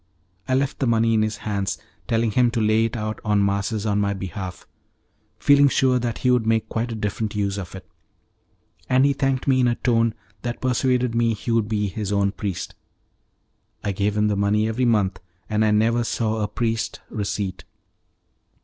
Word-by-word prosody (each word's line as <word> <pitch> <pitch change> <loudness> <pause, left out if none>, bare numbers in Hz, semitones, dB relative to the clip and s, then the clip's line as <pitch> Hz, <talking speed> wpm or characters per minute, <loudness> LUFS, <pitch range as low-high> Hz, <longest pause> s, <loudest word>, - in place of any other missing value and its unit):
I 130 - +2
left 135 +1 0
the 135 - +1
money 115 0 +3
in 110 - +3
his 110 -1 -1
hands, 100 -2 -1 0.3
telling 115 -1 +1
him 125 +2 +3
to 120 - 0
lay 110 +1 +3
it 115 +1 -3
out 110 0 -3
on 105 -2 +2
masses 100 +2 -1
on 105 -1 +1
my 100 0 0
behalf, 95 -1 -6 0.7
feeling 145 +2 +5
sure 130 -2 +3
that 120 -1 -2
he 125 - +2
would 120 -3 +2
make 110 -1 +2
quite 115 +1 -2
a - - -3
different 105 0 -3
use 100 -1 -1
of 95 0 -7
it, 95 - -10 1.0
and 130 +1 +4
he 140 - +3
thanked 135 -1 -1
me 130 -1 +4
in 125 - +4
a 120 - +2
tone 115 -3 +1 0.3
that 120 0 -4
persuaded 125 -1 +1
me 115 -1 +2
he 115 - -4
would 115 -2 +2
be 105 -2 0
his 100 +1 -4
own 100 -1 +2
priest. 100 -3 -4 1.1
I 100 - 0
gave 100 +2 -1
him 105 0 +3
the 105 - +1
money 105 +2 +2
every 120 +3 0
month, 100 -6 +2 0.3
and 110 0 +1
I 110 - +3
never 115 +3 +2
saw 110 -1 -1
a 105 - 0
priest's 115 +1 -2
receipt. 100 -3 -3
110 Hz, 195 wpm, -23 LUFS, 105-120 Hz, 1.1 s, feeling